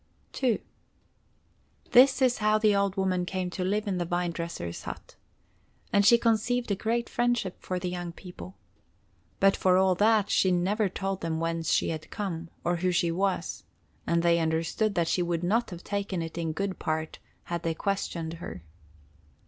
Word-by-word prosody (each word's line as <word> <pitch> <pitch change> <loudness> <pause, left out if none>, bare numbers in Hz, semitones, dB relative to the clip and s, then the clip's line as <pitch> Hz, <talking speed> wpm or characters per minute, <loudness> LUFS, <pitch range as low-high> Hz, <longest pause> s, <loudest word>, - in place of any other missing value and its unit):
II 245 -5 +2 1.3
This 260 +1 +6
is 250 -1 +3
how 215 0 +3
the 215 -1 +3
old 200 -1 +1
woman 185 -2 +1
came 180 0 -3
to 180 - -3
live 205 +4 0
in 190 -3 -1
the - - +1
vine 175 0 -1
dresser's 165 - -5
hut. - - -8 0.8
And 200 - +5
she 235 +4 +7
conceived 235 +1 +1
a - - +2
great 230 +4 -1
friendship 240 -6 -1
for 185 - -3
the 180 0 -3
young 175 -1 -4
people. 180 +1 -11 0.8
But 195 0 +5
for 185 -1 +3
all 190 0 +4
that 210 +2 +3
she 190 - +3
never 195 +4 +1
told 195 +1 -3
them 160 -1 -2
whence 165 0 -1
she - - +2
had 155 -1 -5
come, 170 -5 -4
or 175 0 +1
who 180 +1 +1
she 170 -1 +1
was, 190 +2 -1 0.4
and 170 0 +2
they 170 0 +4
understood 165 +6 0
that 170 -2 +1
she 180 - +1
would 170 -1 -1
not 225 +7 +1
have 175 -1 -9
taken 200 -4 -2
it 165 - -7
in 165 -2 -2
good 195 +3 -3
part 160 -1 -3 0.2
had 170 -1 -4
they 165 -1 -1
questioned 170 -4 -2
her. 90 - -7
185 Hz, 180 wpm, -28 LUFS, 170-205 Hz, 1.3 s, she